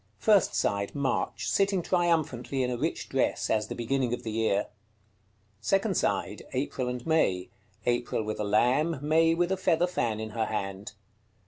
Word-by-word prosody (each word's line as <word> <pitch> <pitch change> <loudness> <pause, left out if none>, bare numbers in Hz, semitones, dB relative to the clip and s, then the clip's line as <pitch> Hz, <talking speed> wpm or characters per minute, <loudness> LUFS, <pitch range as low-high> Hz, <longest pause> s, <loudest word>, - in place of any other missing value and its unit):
First 205 - +3
side. 100 0 0
March. 120 -4 -1
Sitting 195 - +2
triumphantly 155 -8 0
in 125 - -1
a - - -1
rich 150 +7 -2
dress, 135 - 0
as 110 -1 +1
the - - -5
beginning 120 +1 0
of - - -13
the 110 - -4
year. 110 -2 +1 0.9
Second 195 - +1
side. 100 +1 -1
April 130 -1 -2
and 125 -1 -5
May. 120 - +1 0.4
April 120 -2 0
with 110 0 -4
a - - 0
lamb: 125 +10 +2
May 165 +2 +4
with 175 +2 +1
a 190 - +1
feather 175 -1 +2
fan 115 -11 -1
in 110 0 -5
her 110 0 -1
hand. 100 -2 -4
125 Hz, 165 wpm, -28 LUFS, 110-165 Hz, 0.9 s, May